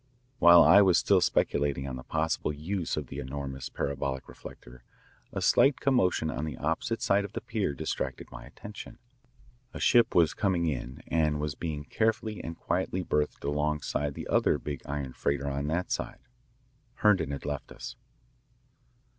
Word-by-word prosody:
While 85 0 +9
I 100 +2 +8
was 95 -3 +5
still 95 -2 +3
speculating 70 -5 +1
on 65 - -4
the 65 - -7
possible 80 +1 -1
use 80 +4 -3
of 75 - -2
the - - -7
enormous 65 0 -5
parabolic 70 -1 -3
reflector, - - -12 0.5
a - - -3
slight 140 -1 +4
commotion 95 -11 +2
on - - -4
the 80 -2 -4
opposite 80 +9 -2
side 100 +1 +3
of 100 +1 -8
the - - -4
pier 105 -10 -2
distracted - - -4
my - - -9
attention. 105 0 -10 0.8
A - - -5
ship 120 -2 +4
was 85 -3 +4
coming 95 -4 0
in 65 -4 -4
and 75 -2 +1
was 75 -1 -2
being 75 -1 -4
carefully 110 +5 -1
and 85 0 -6
quietly 95 0 -1
berthed 75 -3 -1
alongside 75 0 -1
the - - -6
other - - +2
big 75 -3 -6
iron 70 -2 -4
freighter 70 0 -1
on 70 +1 -2
that 85 +4 -2
side. - - -3 0.7
Herndon 95 -8 +3
had 70 -1 -5
left 75 -1 -4
us. - - -8
75 Hz, 165 wpm, -29 LUFS, 70-90 Hz, 0.8 s, While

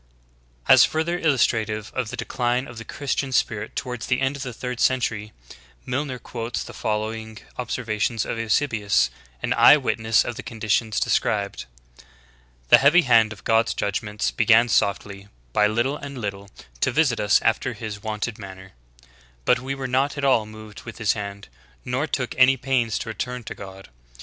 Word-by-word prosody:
"^ - - -35
V - - -36
12. - - -18
As - - +8
further 165 +3 -1
illustrative 110 - +1
of 125 -4 -2
the - - -6
decline 125 +1 -1
of 120 -1 -9
the - - -7
Christian 140 +1 -3
spirit 110 -3 -1
toward 125 -3 -4
the 125 +1 0
end 135 +1 0
of 140 - -7
the 130 -2 -4
third 125 0 -5
century, 110 -5 0 0.5
Milner 130 0 -2
quotes 120 -1 -5
the - - -10
following 110 0 -3 0.2
observation 115 -2 -2
of 115 - -4
Eusebius, 110 -3 +1 0.3
an - - +1
eye - - +8
witness 110 0 +1
of 120 -1 -5
the - - -5
conditions 110 -1 -1
described: 100 -2 0 1.0
"The - - +9
heavy 160 +6 +5
hand 115 -4 +4
of 110 - -10
God's 115 +1 +2
judg 100 +2 -1
ments 105 -1 -2
began 115 +1 +4
softly, 100 -1 0 0.3
by 105 - +4
little 120 +7 0
and 140 -2 -8
little, 100 -3 -5 0.3
to - - +1
visit 135 -3 +2
us 105 0 +4
after - - +1
his 105 -2 -7
wonted 110 +1 -4
manner; 95 -1 -10 0.7
\^^i - - +5
^^^q 130 +3 -4
were 135 -1 -5
not 135 +3 0
at 140 - -1
all 115 -5 +3
moved 110 -1 -11
with 115 -2 -10
his 105 -3 +2
hand, 100 -1 -7 0.4
nor 130 +5 -1
took 130 -4 -2
any 130 +1 +6
pains 125 -4 0
to 115 - -5
return 125 +2 -4
to 115 - -6
God. 95 0 -11
115 Hz, 180 wpm, -23 LUFS, 105-125 Hz, 1.0 s, The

